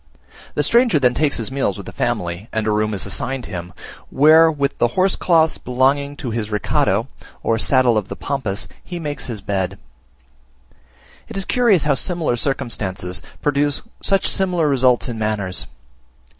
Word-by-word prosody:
The - - +2
stranger 235 -7 +4
then 125 -3 +3
takes 145 +1 +1
his 115 +1 -3
meals 135 -8 -1
with - - -8
the - - -8
family, 85 +5 -3
and 110 -1 -1
a 110 - +1
room 105 0 0
is 95 - -2
assigned 130 -1 -2
him, 85 -2 -6 0.4
where 160 +3 +6
with 140 -2 -1
the 120 - +4
horsecloths 175 -4 +2
belonging 135 +3 +1
to 125 -5 -4
his 110 -2 -3
recado 105 -2 +1 0.4
(or 115 0 +1
saddle 125 -2 +3
of 100 - -8
the - - -6
Pampas) 105 -9 -3 0.2
he 175 - -6
makes 150 -3 -5
his 115 -5 -5
bed. 95 -1 -2 1.5
It - - -7
is 195 - -2
curious 230 - +3
how 150 - +3
similar 165 -2 0
circumstances 105 -8 -2 0.2
produce 145 0 +1 0.2
such 195 -1 +2
similar 180 -5 +1
results 130 -3 +3
in 115 -3 -5
manners. 105 -4 -1
130 Hz, 160 wpm, -20 LUFS, 105-150 Hz, 1.5 s, where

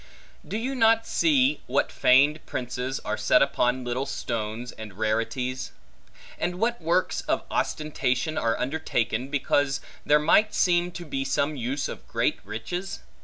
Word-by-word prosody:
Do 210 - -4
you 255 +4 -2
not 225 -2 +4
see 290 -3 +2
what - - +1
feigned 145 +5 +4
prices, 125 +1 -3
are - - -1
set 125 - +4
upon 130 -2 +1
little 125 +2 -2
stones 115 +1 -4
and 105 -3 -10
rarities? 115 +4 -1 0.7
and 175 - -1
what 230 +4 0
works 170 +3 +1
of - - +1
ostentation 150 -1 -1
are 115 0 +1
undertaken, 130 -4 -1
because 145 0 +1 0.2
there 150 - +5
might 170 +8 +3
seem 175 -1 +3
to 175 - -7
be 135 -3 -2
some 140 +2 0
use 130 +2 -2
of - - -9
great - - 0
riches? 115 - -5
140 Hz, 145 wpm, -26 LUFS, 125-175 Hz, 0.7 s, there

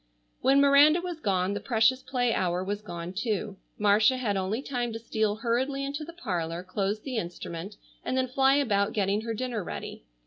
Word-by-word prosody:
When 270 +1 +4
Miranda 285 +4 +6
was 350 -2 -5
gone 190 -5 0
the 205 - -2
precious 240 +2 +2
play 250 -3 0
hour 180 0 0
was 205 +2 -3
gone 175 -3 -6
too. 210 -1 -2 0.2
Marcia 210 +5 +4
had 220 -6 -1
only 195 +7 -2
time 245 -4 -2
to - - -3
steal 220 -2 -1
hurriedly 255 +5 -1
into 285 +2 -4
the 330 - -8
parlor, 175 - -3
close 195 +3 -2
the 255 -1 -4
instrument, 175 0 -5 0.3
and 255 - -1
then 260 0 +1
fly 270 +1 +3
about 210 -8 +1
getting 200 0 +1
her 225 0 -4
dinner 240 -3 -3
ready. - - -7
220 Hz, 185 wpm, -28 LUFS, 195-260 Hz, 0.3 s, Miranda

